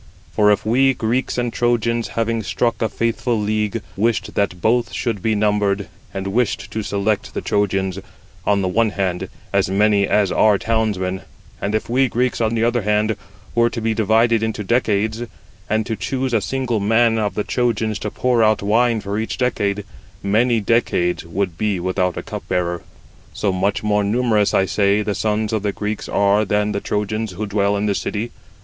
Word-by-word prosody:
For 105 -1 +3
if 105 - +1
we, 130 +4 +3
Greeks 120 +3 -1
and 120 -1 -1
Trojans, 120 -1 +1
having 115 0 -1
struck 115 +2 -1
a 110 - +1
faithful 115 0 -1
league, 105 +1 -1
85 115 - -6
wished 115 +2 0
that 95 -3 0
both 115 +5 +1
should 115 -6 -2
be 110 +1 +1
numbered, 105 -1 +1 0.2
and 95 0 -5
[wished] 105 +3 -1
to 110 - -2
select 100 +1 -1
the - - -2
Trojans, 95 -2 0 0.4
on 100 -1 +2
the - - +1
one 110 +5 +2
hand, 95 -3 -2 0.2
as 100 -1 +2
many 100 0 +3
as 105 -3 +2
are 105 -2 +4
townsmen; 100 -4 -1 0.4
and 105 +2 -1
if 110 - -1
we 130 +3 +2
Greeks, 125 +1 0
on 110 0 +1
the 115 - +1
other 120 0 +2
hand, 105 +1 +1 0.4
were 120 0 +3
to 120 - -5
be 115 0 0
divided 110 +1 +3
into 110 -1 -2
decades, 110 0 +1 0.5
and 110 0 +1
to 110 - -2
choose 130 +6 -2
a 110 - +3
single 130 -1 -1
man 115 +2 +3
of 105 -1 -1
the 105 - 0
Trojans 110 -4 0
to - - -3
pour 125 -2 +1
out 110 -1 +2
wine 115 +2 +2
[for 100 +1 -3
each 110 - -3
decade], 105 -5 0 0.4
many 115 +4 +2
decades 100 -6 +1
would 90 0 -3
be 105 -4 0
without 90 0 -1
a - - -4
cupbearer. 85 -1 -2
86 - - -19
So 100 - +1
much 100 +3 0
more 105 -1 +2
numerous, 110 -1 +2
I 95 - +4
say, 100 +1 +2
the 105 - -1
sons 110 +1 -1
of 110 - +1
the 105 0 0
Greeks 105 +1 -4
are 100 +1 +3
than 105 0 0
the 100 -1 -2
Trojans 105 0 -2
who 110 +4 -3
dwell 100 0 +1
in 100 - -1
the 105 - +1
city. 110 +4 -3
105 Hz, 190 wpm, -20 LUFS, 100-115 Hz, 0.5 s, are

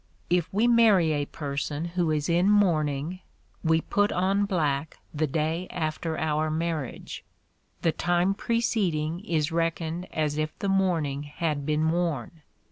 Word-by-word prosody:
If 175 -2 +2
we 215 +5 +2
marry 220 -9 +5
a 145 -1 -1
person 145 +2 -3
who 170 -1 -1
is 150 -1 0
in 175 +3 +3
mourning, 165 -5 +2 0.4
we 160 -1 +3
put 205 +4 +1
on 195 +3 +1
black 155 -6 -1 0.2
the 155 0 0
day 160 +5 -1
after 160 -1 -3
our 155 0 0
marriage; 160 -4 -3 0.6
the 165 - +4
time 175 +3 +1
preceding 190 -8 0
is 160 -6 0
reckoned 165 +1 -1
as 150 -1 -1
if 155 0 -2
the 200 - -2
mourning 170 -8 +1
had 150 -1 -3
been 155 +1 +2
worn. 165 -3 -2
165 Hz, 140 wpm, -27 LUFS, 155-180 Hz, 0.6 s, marry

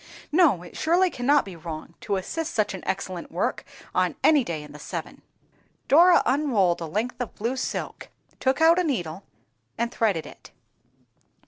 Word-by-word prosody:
No, 300 - +4
it 175 - -13
surely 350 +3 +2
cannot 280 +4 +2
be 190 -3 -9
wrong 165 0 -8
to 200 - -1
assist 325 - -4
such 210 -2 +1
an 190 - -6
excellent 185 -2 -4
work - - -1 0.3
on - - +1
any 300 -4 +5
day 160 -7 -4
in 150 - -12
the 150 - -11
seven." - - -7 0.7
Dora 345 +4 +6
unrolled 230 - +2
a 165 - -3
length 230 +8 -3
of 245 - -5
blue 235 +5 -2
silk, 260 - -4 0.3
took 265 +3 +1
out 330 +2 +6
a - - +2
needle 185 - -2 0.6
and 235 0 -1
threaded 205 -10 0
it. - - -13
230 Hz, 165 wpm, -25 LUFS, 180-295 Hz, 0.7 s, Dora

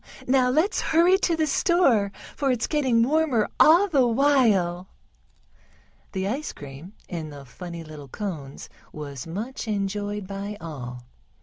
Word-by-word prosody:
Now 255 -1 +3
let's 315 +11 +2
hurry 345 +4 +4
to 340 -4 +1
the 320 -1 +1
store, 275 - +3 0.2
for 280 -2 0
it's 245 -3 +1
getting 260 -7 +2
warmer 275 -5 +2
all 345 +6 +7
the 275 -9 +3
while." 225 -9 +2 1.3
The 190 -1 -2
ice 270 +9 -3
cream 145 +7 -10
in 165 -3 -5
the 140 -2 -10
funny 170 +5 -8
little 155 -3 -10
cones 150 - -6 0.2
was 140 -2 -7
much 225 +9 -5
enjoyed 205 0 -2
by 200 +2 -6
all. 125 -8 -7
210 Hz, 135 wpm, -25 LUFS, 170-275 Hz, 1.3 s, all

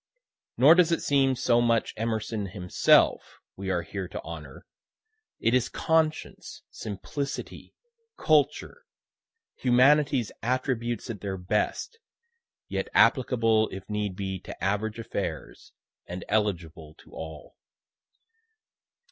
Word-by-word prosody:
Nor 145 +5 +8
does 175 -1 +4
it 165 - 0
seem 135 -2 +3
so 120 -1 +2
much 115 -1 +1
Emerson 110 -2 -2
himself 90 -1 +2 0.2
we 95 0 -5
are 90 -2 0
here 95 +3 -5
to - - -7
honor 75 -5 -9 0.7
it 115 - +1
is 125 -1 +2
conscience, 160 -1 -1
simplicity, 140 - -6 0.4
culture, 155 - +1 0.7
humanity's 130 -1 +3
attributes 120 -1 -2
at 105 - -8
their 95 -2 -4
best, 105 - -2 0.7
yet - - -3
applicable 115 -4 +3
if 95 0 -9
need 105 -2 -2
be 95 -1 -4
to 85 - -10
average 105 +3 -1
affairs, 95 - -5 0.4
and 90 0 -6
eligible 85 -7 -2
to - - -19
all. 80 -2 -9
110 Hz, 110 wpm, -27 LUFS, 95-130 Hz, 0.7 s, Nor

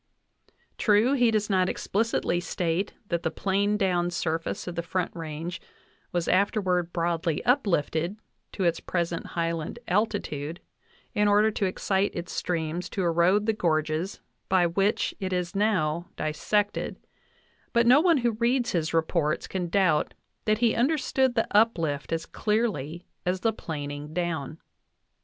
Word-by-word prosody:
True, 215 +5 +4
he 245 -4 +4
does 215 -2 +1
not 185 -2 +2
explicitly 210 -4 0
state 175 +2 -1 0.2
that 170 -1 0
the 160 - 0
planed 200 +4 0
down 180 -3 +1
surface 165 +3 -2
of 175 - -3
the 170 - -2
Front 175 +1 -2
Range 165 +1 -5 0.5
was 175 -1 -1
after 200 +4 +3
ward 180 -3 0
broadly 170 -2 -1
uplifted 190 - +1 0.4
to 195 - -2
its 170 -1 +2
present 170 -1 -2
highland 165 +2 -1
altitude 175 -6 -1 0.5
in 210 0 +2
order 210 +2 +4
to 200 -2 0
excite 190 +1 0
its 175 0 -5
streams 170 0 -2
to 190 - -2
erode 175 +5 +3
the 220 - +2
gorges 160 -1 -1 0.3
by 185 -2 +4
which 195 +5 +1
it 190 -2 -3
is 180 0 -2
now 175 -5 +1
dis 155 0 -3
sected; 205 -1 0 0.8
but 235 -1 +3
no 255 +5 +7
one 340 -2 +4
who 240 -2 +2
reads 240 +3 +1
his 165 -2 -1
reports 160 -1 +1
can 180 -2 -3
doubt 180 -4 +2 0.3
that 215 0 +3
he 230 0 +3
understood 265 -1 +1
the 225 - +2
uplift 165 -10 +2
as 165 0 -1
clearly 185 - -1 0.2
as 180 +1 -1
the 225 -1 +2
planing 145 -4 -6
down. 165 -4 -2
180 Hz, 145 wpm, -27 LUFS, 165-210 Hz, 0.8 s, no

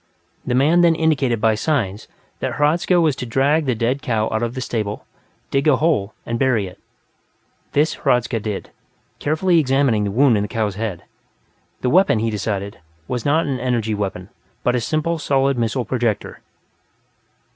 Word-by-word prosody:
The 125 - +1
man 155 +7 +4
then 170 -1 +4
indicated 145 -8 +1
by 110 0 +3
signs 110 -4 -1 0.3
that - - -2
Hradzka 165 +4 +2
was 155 -5 +2
to 125 - -4
drag 140 +5 +2
the 125 - +1
dead 120 +5 -1
cow 110 -4 0
out 110 - -1
of 120 +1 -2
the - - -3
stable, 105 -4 -3 0.5
dig 140 +2 +1
a 150 - +6
hole, 130 -9 0
and 115 0 -3
bury 125 -6 +2
it. 90 -1 -11 0.9
This 150 +3 +2
Hradzka 125 -1 +1
did, 105 -2 -5 0.5
carefully 165 +3 +2
examining 135 -6 +2
the 100 - -1
wound 120 +2 +4
in - - 0
the 105 - -2
cow's 110 -3 -1
head 100 -3 -4 0.8
the 125 - +1
weapon, 185 -9 +4
he 115 +1 0
decided, 100 -1 -3 0.3
was 125 -2 -3
not 155 +3 +2
an 135 -3 -2
energy 120 -3 -1
weapon, 95 -2 -4 0.3
but 125 - +2
a 125 - 0
simple 155 +6 -1
solid 135 -1 +1
missile 120 +1 -1
projector. 120 -3 -2
125 Hz, 170 wpm, -20 LUFS, 110-145 Hz, 0.9 s, a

